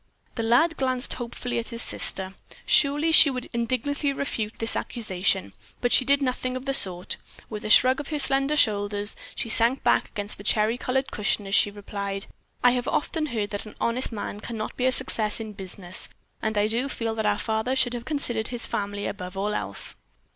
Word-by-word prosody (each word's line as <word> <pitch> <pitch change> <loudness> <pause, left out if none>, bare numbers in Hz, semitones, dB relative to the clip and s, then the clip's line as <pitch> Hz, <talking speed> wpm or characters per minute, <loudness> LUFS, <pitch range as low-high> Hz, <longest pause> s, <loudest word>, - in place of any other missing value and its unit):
The 230 - -3
lad 245 +9 +3
glanced 255 -1 +1
hopefully 245 0 -4
at 230 - -4
his 230 -2 -1
sister. 190 0 +1 0.3
Surely 295 +3 +4
she 315 -2 +8
would 250 -2 -4
indignantly 255 +5 -1
refute 225 -6 -3
this 225 - +2
accusation, 195 -4 -1 0.3
but 245 - +1
she - - +6
did 280 +2 +3
nothing 255 0 -2
of 255 - -9
the 275 - 0
sort. 180 -7 +2 0.3
With 210 -1 -6
a - - -3
shrug 255 +5 +6
of 290 - -6
her 305 - -2
slender 275 +1 +2
shoulders, 205 -3 +1 0.2
she 235 - -3
sank 235 +4 +3
back - - +2
against 205 0 -5
the - - -9
cherry 215 +2 +2
colored 265 +1 -1
cushion 210 0 0
as 195 - -6
she 205 - +6
replied, 200 -1 -5 0.4
"I 245 - +7
have 245 0 -1
often 310 0 -1
heard 215 -6 -3
that 205 +1 -5
an 215 - -12
honest 240 +3 0
man 205 -1 -5
can 230 +1 -6
not 215 - -5
be 255 - +1
a - - +3
success 230 -5 +2
in 220 -1 -6
business, 185 -2 -4 0.3
and 220 -1 -1
I 205 - +3
do 235 +5 -1
feel 230 -3 -3
that 220 -1 -1
our 205 0 +2
father 220 +4 -1
should 250 -2 +2
have 240 -1 -5
considered 245 -7 0
his 240 -1 -3
family 205 0 -3
above 185 -1 -6
all 205 +2 -1
else." - - -3
230 Hz, 205 wpm, -25 LUFS, 205-255 Hz, 0.4 s, she